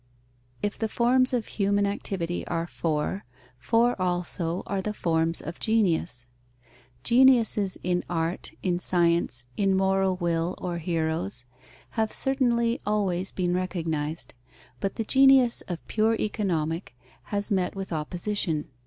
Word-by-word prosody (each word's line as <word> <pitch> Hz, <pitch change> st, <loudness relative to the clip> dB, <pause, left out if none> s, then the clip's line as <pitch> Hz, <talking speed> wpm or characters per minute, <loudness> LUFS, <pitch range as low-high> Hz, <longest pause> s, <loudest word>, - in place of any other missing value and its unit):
_ -, -, -39 dB, 0.6 s
If 205 Hz, -, -2 dB
the 220 Hz, -, -1 dB
forms 255 Hz, +3 st, +3 dB
of 245 Hz, -3 st, 0 dB
human 200 Hz, 0 st, +1 dB
activity 185 Hz, -3 st, -3 dB
are 165 Hz, -1 st, -1 dB
four, 165 Hz, +3 st, -2 dB, 0.4 s
four 230 Hz, -, +2 dB
also 175 Hz, -1 st, -1 dB
are 195 Hz, -1 st, -2 dB
the 210 Hz, +2 st, -3 dB
forms 165 Hz, -1 st, +1 dB
of 165 Hz, +3 st, -7 dB
genius. 180 Hz, -, +1 dB, 0.8 s
Geniuses 235 Hz, -, +4 dB
in 180 Hz, 0 st, 0 dB
art, 170 Hz, +1 st, -2 dB
in 175 Hz, -2 st, +1 dB
science, 170 Hz, -9 st, +1 dB
in 195 Hz, -1 st, +2 dB
moral 190 Hz, 0 st, +2 dB
will 170 Hz, -1 st, -1 dB
or 175 Hz, -2 st, -3 dB
heroes, 160 Hz, -, -2 dB, 0.5 s
have 220 Hz, -1 st, 0 dB
certainly 240 Hz, -3 st, +1 dB
always 195 Hz, -3 st, 0 dB
been 175 Hz, -1 st, -1 dB
recognized. 165 Hz, -4 st, -2 dB, 0.5 s
But 195 Hz, -, -2 dB
the 225 Hz, -, -1 dB
genius 265 Hz, 0 st, +5 dB
of 175 Hz, -2 st, -5 dB
pure 220 Hz, +1 st, +2 dB
Economic 165 Hz, -, -2 dB, 0.3 s
has 205 Hz, +1 st, -2 dB
met 185 Hz, -2 st, +1 dB
with 195 Hz, -2 st, -5 dB
opposition. 165 Hz, 0 st, -2 dB
185 Hz, 130 wpm, -26 LUFS, 165-215 Hz, 0.8 s, genius